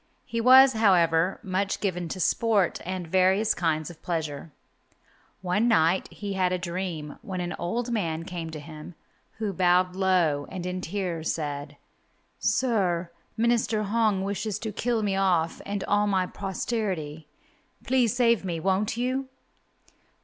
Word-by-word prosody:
He 230 0 -2
was, 260 +2 +8
however, 180 -5 +3
much 190 +1 -1
given 180 -4 -2
to 185 - -5
sport 205 0 +2
and 185 0 -4
various 190 +5 +3
kinds 160 -1 -1
of 170 - -16
pleasure. 160 -3 -3 0.9
One 190 +6 +1
night 175 -4 +2
he 205 -1 -5
had 185 -1 +1
a 185 - +1
dream, 170 -4 -5
when 185 -1 -5
an 175 0 -3
old 230 +8 -2
man 165 -8 -1
came 175 -3 -5
to 160 -1 -7
him, 155 +2 -10 0.4
who 215 -3 -3
bowed 180 0 +2
low, 175 -7 +2
and 185 -2 -6
in 180 0 -3
tears 175 -4 -2
said, 145 -2 -5 0.6
"Sir, 185 -9 +1 0.3
Minister 230 -2 +1
Hong 210 -2 +1
wishes 200 +1 -2
to 220 - -5
kill 225 0 -1
off 175 -4 +1
me - - -11
and 200 -1 -3
all 205 +1 +2
my 190 -2 +1
posterity. 185 -6 -4 0.6
Please 250 -3 +2
save 235 -4 +3
me, 175 -3 -3
won't 195 +6 0
you?" 255 +2 -1
185 Hz, 145 wpm, -26 LUFS, 170-215 Hz, 0.9 s, was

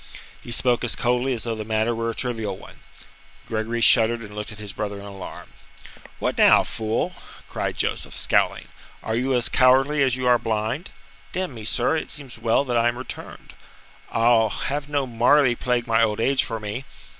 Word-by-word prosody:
He - - -12
spoke 120 +1 +2
as 120 - +1
coldly 125 +2 0
as 115 -3 -2
though 115 - -2
the 110 -1 -5
matter 110 +2 0
were 115 0 -2
a 115 - -4
trivial 110 -6 -2
one. - - -14 0.7
Gregory 115 +1 -2
shuddered 115 +1 +5
and 105 -2 -10
looked 105 +1 -5
at 105 - -11
his 105 -2 -6
brother 105 -1 -4
in 100 - -10
alarm. 100 -2 -9 0.7
"What - - -2
now, - - +6
fool?" 110 0 -2 0.3
cried - - -3
Joseph, - - -3
scowling. - - +1 0.3
"Are 110 - -2
you 130 +2 0
as 120 -1 +4
cowardly 135 +3 +4
as 130 -2 +3
you 130 0 -3
are 120 -1 +5
blind? 110 +8 -2 0.4
Damn 185 -6 -3
me, 110 -3 -8
sir, 120 +7 +1
it - - -5
seems 135 -6 -3
well 115 +4 +2
that 120 -2 0
I 115 0 +3
am 120 0 -1
returned. 130 - -9 0.6
I'll 115 -1 +3
have 140 +7 -3
no 145 -2 0
Marleigh 125 +2 +3
plague 120 -1 -1
my 115 -1 +2
old 110 -2 +1
age 135 +3 +2
for 115 -2 -4
me." 105 +5 -5
120 Hz, 190 wpm, -23 LUFS, 110-130 Hz, 0.7 s, now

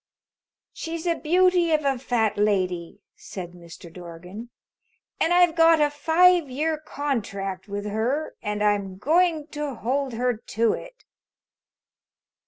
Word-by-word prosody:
"She's 330 0 -6
a 340 - +2
beauty 350 +1 +2
of 305 -2 +1
a 270 -2 +1
Fat 235 -4 0
Lady," 185 -3 -1
said 180 -3 -8
Mr. 170 -1 -13
Dorgan, 180 +6 -10 0.7
"and 330 - +2
I've 350 -2 +4
got 330 -1 +5
a 295 -1 +3
five 330 +2 +4
year 305 +4 -1
contract 205 -11 -4
with 205 0 -5
her 235 +9 -1
and 210 0 -2
I'm 200 -2 0
going 320 - +2
to 295 -3 -4
hold 260 +3 -2
her 245 0 0
to 225 +1 0
it." - - -10
255 Hz, 130 wpm, -24 LUFS, 205-320 Hz, 0.7 s, got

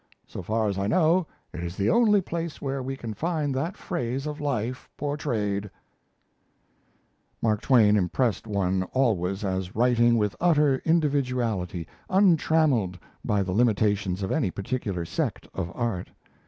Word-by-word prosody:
So - - -7
far 110 +4 0
as 100 -1 -2
I 100 - 0
know, 165 - +3 0.3
it 85 - -5
is 85 +1 -5
the 100 +2 +2
only 210 -4 +4
place 170 -2 -4
where 135 -1 -3
we 135 +1 -4
can 115 -4 -5
find 155 - -1
that 160 +8 -2
phase 125 +3 -3
of 150 0 -5
life 125 -3 -2
portrayed." 110 -9 -2 1.7
Mark 110 -2 +1
Twain 110 -6 +5
impressed 105 +3 0
one 95 -3 0
always 100 -6 +1
as 95 -1 -3
writing 120 0 +4
with 105 -2 0
utter 150 -6 +4
individuality 125 - 0 0.2
untrammelled 160 - +3 0.3
by 100 -1 +1
the 95 - -4
limitations 105 -4 +1
of 95 - -2
any 135 -12 +1
particular 100 -3 -3
sect - - -3
of 85 -3 -4
art. 115 -7 -2
115 Hz, 140 wpm, -26 LUFS, 100-145 Hz, 1.7 s, Twain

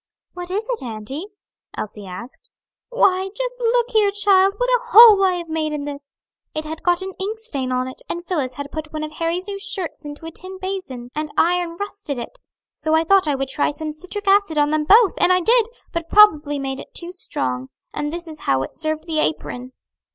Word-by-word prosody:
"What 355 0 -7
is 415 +4 -2
it, 480 - -2
auntie?" 245 - -5 0.5
Elsie 205 -1 -6
asked. 240 - -9 0.4
"Why, 385 -6 +2
just - - -3
look 480 0 +1
here, 430 -3 +4
child, 395 -1 +3
what - - 0
a - - +4
hole 450 -4 +9
I 375 -1 +4
have 345 -1 -4
made 315 -1 -2
in 295 -1 -3
this! 285 -1 -8 0.4
It 310 0 -2
had 315 +1 -6
got 350 +1 +2
an 380 0 -6
ink 415 +4 -2
stain 280 - -3
on 255 0 0
it, 260 - -9
and 345 +1 -4
Phillis 275 -9 -2
had 285 +1 -6
put 310 -1 -6
one 310 0 -4
of 305 - -5
Harry's 335 +4 -2
new 400 -1 -5
shirts 370 -5 -4
into 295 +2 -8
a 325 - -6
tin 370 +3 -7
basin, 370 -11 -6
and 305 0 -3
iron 350 0 +2
rusted 405 -8 -5
it; 370 - -7 0.3
so 315 0 0
I 320 - +3
thought 380 0 +4
I 290 - +2
would 270 0 -3
try 280 - +1
some 305 +1 -5
citric 370 +6 -5
acid 390 -5 +3
on 295 0 +3
them 305 0 +1
both; 420 +4 +6
and 365 - +4
I 365 - +5
did; 455 +5 +4 0.3
but 335 -1 -3
probably 305 -9 +5
made 270 -1 -4
it - - -12
too 345 0 -5
strong, 130 - -3 0.2
and 295 0 -3
this 345 +1 -4
is 310 -1 -9
how 135 0 +3
it - - -8
served 310 0 -2
the 320 -2 -1
apron." 255 -5 -2
330 Hz, 215 wpm, -21 LUFS, 290-390 Hz, 0.5 s, hole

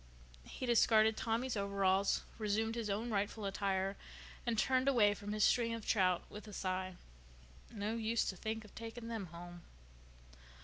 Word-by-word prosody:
He - - -5
discarded 220 -2 +5
Tommy's 230 +3 -1
overalls, 200 -1 +2 0.2
resumed 220 +1 0
his 230 -2 -3
own 220 +4 -1
rightful 205 +1 -1
attire, 195 0 -1 0.5
and 235 -2 +1
turned 260 +4 +2
away 220 -7 +5
from 205 0 -6
his 210 0 +1
string 230 -2 +3
of 225 - -7
trout 185 -4 +3
with 210 +1 -10
a 210 - -9
sigh. 185 -1 -2 0.8
No 215 0 -2
use 230 0 +1
to 190 - -4
think 220 +3 -4
of 215 - -16
taking 230 +1 -7
them 220 -5 -4
home. 175 +1 -10
215 Hz, 160 wpm, -36 LUFS, 195-230 Hz, 0.8 s, discarded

